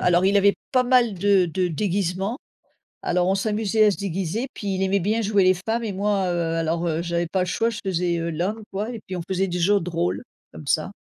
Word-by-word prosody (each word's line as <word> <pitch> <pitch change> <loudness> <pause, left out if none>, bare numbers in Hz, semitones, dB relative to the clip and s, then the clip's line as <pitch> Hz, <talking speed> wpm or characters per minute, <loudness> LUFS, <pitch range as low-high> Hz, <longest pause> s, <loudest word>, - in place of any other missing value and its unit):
alors, 180 +1 +3
il 200 +1 +4
avait 200 0 +5 0.2
pas 255 - +4
mal 245 -3 +3
de 195 -1 +3
de 180 +2 -1
déguisements 195 - -1 0.7
alors, 180 +1 +1
on 190 - +3
s'amusait 215 +1 +2
à - - +5
se - - -2
déguiser 195 +4 -2
puis, 200 -2 -3
il 190 - -1
aimait 195 +1 +2
bien 215 +5 0
jouer 205 -1 +2
les 185 0 +5
femmes 225 +6 -2
et 210 - -2
moi, 200 0 0
heu, 165 -1 -1
alors, 165 +1 -1
heu, 160 0 0
j'avais 170 0 -1
pas 185 +3 -1
le 180 - 0
choix, 225 +6 0
je 220 - -6
faisais, 175 -2 0
heu, 165 0 -2
l'homme, 185 +8 -2
quoi, 210 +4 -3
et 230 - -7
puis 185 - -5
on 175 - -4
faisait 190 0 0
des 175 - -2
jeux 200 +4 +3
de 165 - -5
rôles, 170 +4 -1 0.3
comme 150 - -11
ça. 155 +7 0
190 Hz, 245 wpm, -23 LUFS, 175-205 Hz, 0.7 s, avait